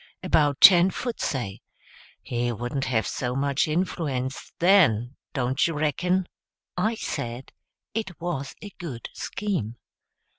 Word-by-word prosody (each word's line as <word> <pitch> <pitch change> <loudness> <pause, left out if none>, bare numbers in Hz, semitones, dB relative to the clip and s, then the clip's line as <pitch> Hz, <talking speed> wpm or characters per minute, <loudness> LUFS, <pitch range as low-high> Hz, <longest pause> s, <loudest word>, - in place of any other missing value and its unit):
about 145 -3 +2
ten 180 -1 +9
foot, 240 +4 -4
say. 120 -8 -3 0.6
He 120 0 -1
wouldn't 120 +4 -3
have 115 -4 +1
so 125 0 -2
much 140 +1 +1
influence, 150 -6 -2
then, 150 - +4 0.2
don't 130 +2 +1
you 165 - -3
reckon?" 175 +5 0 0.5
I 215 +6 +1
said 130 - -5 0.4
it 210 -6 -4
was 165 -5 -4
a 205 - -8
good 135 -9 -6
scheme. 185 - -3
145 Hz, 120 wpm, -25 LUFS, 125-180 Hz, 0.6 s, ten